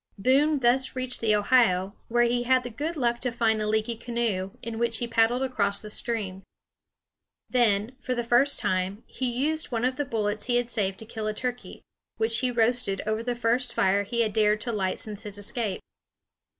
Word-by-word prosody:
Boone 275 Hz, +8 st, +3 dB
thus 255 Hz, +2 st, +2 dB
reached 255 Hz, -1 st, -3 dB
the 215 Hz, -2 st, +3 dB
Ohio, 205 Hz, -3 st, +3 dB
where 240 Hz, +1 st, +3 dB
he 240 Hz, 0 st, +2 dB
had 255 Hz, +1 st, +3 dB
the 245 Hz, -, -6 dB
good 305 Hz, +8 st, -3 dB
luck 240 Hz, -3 st, +1 dB
to 250 Hz, -, -2 dB
find 225 Hz, -2 st, +1 dB
a 210 Hz, -, -1 dB
leaky 220 Hz, +2 st, 0 dB
canoe, 230 Hz, -5 st, -2 dB
in 225 Hz, 0 st, -5 dB
which 235 Hz, -1 st, +1 dB
he 240 Hz, -, -2 dB
paddled 230 Hz, +2 st, +2 dB
across 200 Hz, -6 st, 0 dB
the 210 Hz, -, -8 dB
stream. 205 Hz, -5 st, -2 dB, 1.1 s
Then, 230 Hz, -1 st, +2 dB
for 255 Hz, 0 st, -2 dB
the 240 Hz, -, -1 dB
first 245 Hz, +4 st, +3 dB
time, 185 Hz, +3 st, -1 dB
he 255 Hz, -1 st, -3 dB
used 305 Hz, +6 st, -1 dB
one 235 Hz, 0 st, 0 dB
of 255 Hz, 0 st, 0 dB
the 290 Hz, -, 0 dB
bullets 210 Hz, -3 st, -2 dB
he 245 Hz, -, +1 dB
had 245 Hz, 0 st, 0 dB
saved 195 Hz, -4 st, -1 dB
to 220 Hz, -, -8 dB
kill 220 Hz, -1 st, -5 dB
a 215 Hz, -, -2 dB
turkey, 245 Hz, +1 st, -5 dB, 0.3 s
which 225 Hz, +1 st, 0 dB
he 255 Hz, -, +1 dB
roasted 235 Hz, -4 st, +1 dB
over 215 Hz, +1 st, -1 dB
the 245 Hz, +1 st, -2 dB
first 240 Hz, +1 st, 0 dB
fire 195 Hz, +2 st, +3 dB
he 235 Hz, +4 st, -1 dB
had 215 Hz, -3 st, 0 dB
dared 215 Hz, -1 st, +3 dB
to 235 Hz, -, -2 dB
light 190 Hz, -4 st, -1 dB
since 210 Hz, -2 st, -6 dB
his 205 Hz, -2 st, -6 dB
escape. 205 Hz, 0 st, -3 dB
230 Hz, 205 wpm, -27 LUFS, 210-245 Hz, 1.1 s, Boone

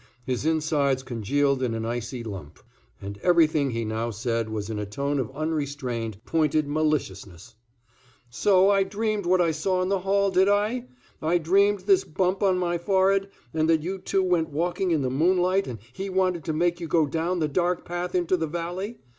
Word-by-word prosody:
His 130 Hz, +3 st, -2 dB
insides 150 Hz, -4 st, +1 dB
congealed 135 Hz, +3 st, 0 dB
in 120 Hz, -3 st, -1 dB
an 110 Hz, 0 st, -3 dB
icy 120 Hz, +1 st, -4 dB
lump, 95 Hz, -9 st, -8 dB, 0.5 s
and 100 Hz, +1 st, -7 dB
everything 155 Hz, -, +3 dB
he 115 Hz, -2 st, -2 dB
now 110 Hz, +2 st, -2 dB
said 115 Hz, 0 st, -2 dB
was 105 Hz, -2 st, -4 dB
in 110 Hz, -2 st, -4 dB
a 105 Hz, -, -3 dB
tone 140 Hz, +7 st, -2 dB
of 125 Hz, -, -2 dB
unrestrained, 140 Hz, -8 st, -3 dB
pointed 155 Hz, -2 st, +1 dB
maliciousness. 145 Hz, -, -2 dB, 0.8 s
"So 190 Hz, +8 st, +4 dB
I 195 Hz, -1 st, +3 dB
dreamed 205 Hz, 0 st, -1 dB
what 185 Hz, 0 st, +4 dB
I 170 Hz, -2 st, +2 dB
saw 185 Hz, +4 st, -1 dB
in 185 Hz, -, -2 dB
the 195 Hz, -1 st, +1 dB
hall, 195 Hz, +1 st, +1 dB
did 190 Hz, +1 st, +4 dB
I? 215 Hz, +5 st, +1 dB, 0.4 s
I 165 Hz, +3 st, +2 dB
dreamed 195 Hz, +4 st, +2 dB
this 190 Hz, 0 st, +3 dB
bump 185 Hz, +4 st, -1 dB
on 190 Hz, -2 st, +3 dB
my 175 Hz, -1 st, -1 dB
forehead, 195 Hz, +1 st, +2 dB, 0.2 s
and 160 Hz, 0 st, +1 dB
that 160 Hz, -2 st, +3 dB
you 190 Hz, +3 st, -4 dB
two 190 Hz, +1 st, 0 dB
went 175 Hz, -3 st, +1 dB
walking 175 Hz, +5 st, -1 dB
in 160 Hz, -5 st, +1 dB
the 130 Hz, -, -1 dB
moonlight 180 Hz, +6 st, +2 dB
and 120 Hz, -3 st, -5 dB, 0.2 s
he 195 Hz, +7 st, -5 dB
wanted 185 Hz, -3 st, 0 dB
to 165 Hz, -, -1 dB
make 175 Hz, +2 st, +1 dB
you 170 Hz, -, -5 dB
go 160 Hz, 0 st, +3 dB
down 165 Hz, +5 st, -1 dB
the 155 Hz, -3 st, 0 dB
dark 175 Hz, +4 st, 0 dB
path 175 Hz, +1 st, -4 dB
into 180 Hz, 0 st, +2 dB
the 160 Hz, -1 st, -2 dB
valley? 175 Hz, +7 st, -4 dB
160 Hz, 190 wpm, -25 LUFS, 135-185 Hz, 0.8 s, So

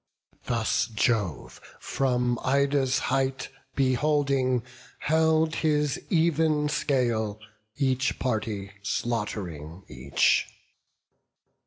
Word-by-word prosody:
Thus 115 Hz, -1 st, 0 dB
Jove, 110 Hz, -6 st, -1 dB, 0.2 s
from 125 Hz, -2 st, 0 dB
Ida's 140 Hz, -1 st, +2 dB, 0.2 s
height 135 Hz, 0 st, 0 dB, 0.3 s
beholding, 135 Hz, -2 st, +1 dB, 0.3 s
held 160 Hz, 0 st, +2 dB
His 150 Hz, -3 st, +1 dB
even 160 Hz, -3 st, +2 dB
scale, 115 Hz, -8 st, 0 dB, 0.4 s
each 130 Hz, -2 st, +1 dB
party 105 Hz, -5 st, -2 dB
slaught'ring 95 Hz, -7 st, -3 dB
each. 65 Hz, +2 st, +1 dB
130 Hz, 70 wpm, -27 LUFS, 110-145 Hz, 0.4 s, Ida's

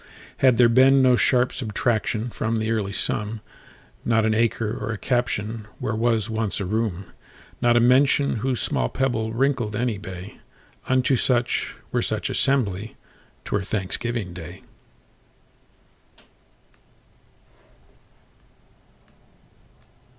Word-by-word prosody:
Had 130 Hz, -3 st, +4 dB
there 120 Hz, -, +6 dB
been 130 Hz, +3 st, +5 dB
no 125 Hz, -1 st, +5 dB
sharp 125 Hz, 0 st, +2 dB
subtractionFrom 115 Hz, 0 st, -1 dB
the 110 Hz, +1 st, -1 dB
early 105 Hz, -3 st, -1 dB
sum, 105 Hz, +2 st, -2 dB, 0.6 s
Not 115 Hz, -1 st, +2 dB
an 110 Hz, -, +2 dB
acre 115 Hz, -1 st, 0 dB
or -, -, -3 dB
a 110 Hz, -, -3 dB
captionWhere 110 Hz, -2 st, -2 dB
was 115 Hz, -1 st, +1 dB
once 110 Hz, -2 st, -2 dB
a 100 Hz, -, -2 dB
room, 100 Hz, -2 st, -2 dB, 0.6 s
Not 120 Hz, 0 st, +4 dB
a -, -, +6 dB
mention, 135 Hz, +2 st, +3 dB
whose 125 Hz, +2 st, -1 dB
small -, -, 0 dB
pebbleWrinkled 120 Hz, -1 st, -1 dB
any 115 Hz, -2 st, -1 dB
bay,—Unto 105 Hz, +7 st, -3 dB
such, 120 Hz, -1 st, 0 dB, 0.2 s
were -, -, +1 dB
such -, -, -2 dB
assembly,'T 110 Hz, -6 st, -3 dB
were 100 Hz, -, +1 dB
Thanksgiving 100 Hz, +1 st, -3 dB
day. 85 Hz, -3 st, -10 dB
115 Hz, 100 wpm, -23 LUFS, 105-125 Hz, 0.6 s, there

